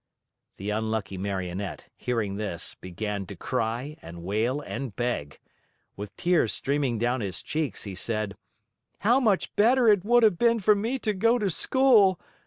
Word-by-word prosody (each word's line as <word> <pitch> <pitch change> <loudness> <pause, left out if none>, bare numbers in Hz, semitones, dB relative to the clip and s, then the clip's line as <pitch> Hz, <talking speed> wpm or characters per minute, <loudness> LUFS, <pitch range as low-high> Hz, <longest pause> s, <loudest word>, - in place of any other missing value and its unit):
The 100 +2 -3
unlucky 110 -2 -2
Marionette, 95 0 -4
hearing 110 -5 -2
this, 100 -5 -4
began 100 +2 -5
to - - -8
cry 120 +7 -3
and 85 +1 -10
wail 110 +9 0
and 135 -6 -6
beg. 120 -12 -2 0.6
With 100 0 -8
tears 175 -10 +2
streaming 140 -4 0
down 120 +2 0
his 95 -4 -4
cheeks, 150 -7 -3
he 100 - -6
said: 105 +1 -2 0.7
"How 240 +6 +4
much 215 -7 +1
better 240 +3 +4
it 205 -4 +5
would 240 +2 +4
have 210 -6 +4
been 235 -1 +3
for 210 +1 +5
me 225 +6 -1
to 215 -4 -1
go 230 +5 +3
to 205 -5 0
school! 220 -4 +4
120 Hz, 160 wpm, -27 LUFS, -, 0.7 s, it